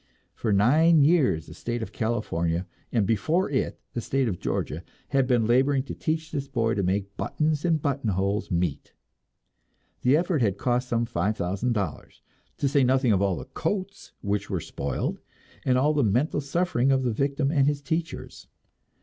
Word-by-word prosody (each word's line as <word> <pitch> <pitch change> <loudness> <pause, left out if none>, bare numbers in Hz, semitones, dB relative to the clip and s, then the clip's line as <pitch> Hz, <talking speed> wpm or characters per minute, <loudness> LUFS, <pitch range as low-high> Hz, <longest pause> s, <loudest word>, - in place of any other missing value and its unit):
For 110 - -2
nine 150 +10 +5
years 140 - +3
the - - -11
state 120 -1 -4
of - - -7
California, 90 -7 -1 0.3
and 110 -4 +2
before 155 - +1
it 130 - -1
the 120 - -2
state 135 +2 0
of 95 -6 -2
Georgia, 80 - -2 0.3
had 135 -2 +2
been 120 -3 +3
laboring 130 +3 +3
to - - -7
teach 160 -1 -2
this 140 -2 -3
boy 115 -5 0
to 100 - 0
make 100 +2 -1
buttons 150 -1 -1
and 165 -3 +2
buttonholes 105 -8 -1
meet; 85 -5 -2 1.1
the 130 +4 +4
effort 170 -3 0
had 100 -4 +1
cost 125 +3 0
some 120 0 +1
five 105 -2 -1
thousand 95 +8 -1
dollars, 100 -8 -4 0.3
to 140 - +1
say 140 0 +3
nothing 130 -1 +3
of 100 -2 +3
all 100 -2 +2
the - - -7
coats 190 +8 -4
which 100 0 -2
were 95 -3 -1
spoiled, - - -3 0.5
and 125 -1 +3
all 145 +4 +3
the 145 -2 +2
mental 125 +8 +1
suffering 140 -3 +1
of 135 -1 +2
the 120 -3 0
victim 140 +3 0
and 140 -3 +3
his 145 -1 0
teachers. 160 +3 -4
125 Hz, 175 wpm, -26 LUFS, 105-145 Hz, 1.1 s, nine